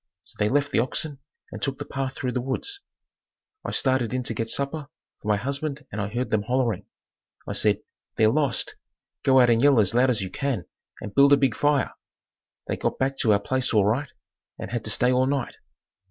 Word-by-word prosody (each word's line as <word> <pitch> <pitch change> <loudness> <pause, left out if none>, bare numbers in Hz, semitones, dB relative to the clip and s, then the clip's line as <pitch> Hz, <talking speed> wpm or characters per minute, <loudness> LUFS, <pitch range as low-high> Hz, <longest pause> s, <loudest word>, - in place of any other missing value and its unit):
So - - -16
they 105 0 +2
left 145 +2 +1
the - - +2
oxen 135 +4 -2 0.3
and - - -7
took 135 -1 -1
the - - -6
path 135 -1 -4
through 125 - -2
the 125 - -1
woods. 135 - -3 0.8
I - - -4
started 130 -3 +1
in 130 - -1
to 120 - -3
get 115 +1 -3
supper 140 +3 -1 0.3
for - - -9
my 105 -1 +3
husband 140 +4 -3
and 105 - -3
I 100 - -1
heard 120 +5 -3
them 110 - +2
hollering. 120 -2 -1 0.6
I - - -3
said, 105 0 +1 0.3
"They're 110 -1 +4
lost. 140 0 0 0.4
Go 130 -1 +5
out 120 -1 +6
and 115 0 +3
yell 140 -3 +5
as 105 -1 +3
loud 125 +2 +4
as 110 -6 +1
you 95 - -6
can 130 - -2 0.4
and 105 - -7
build 140 +1 +6
a - - +7
big 135 -4 +1
fire." 145 -2 +1 0.7
They - - -2
got - - -1
back 135 +1 0
to 115 - +2
our 100 - +4
place 130 +2 -1
all 105 -2 +5
right 130 +7 0 0.5
and - - -7
had 120 -2 -2
to - - -3
stay 125 +4 +2
all 130 +1 +3
night. 140 -2 -2
130 Hz, 215 wpm, -25 LUFS, 110-140 Hz, 0.8 s, a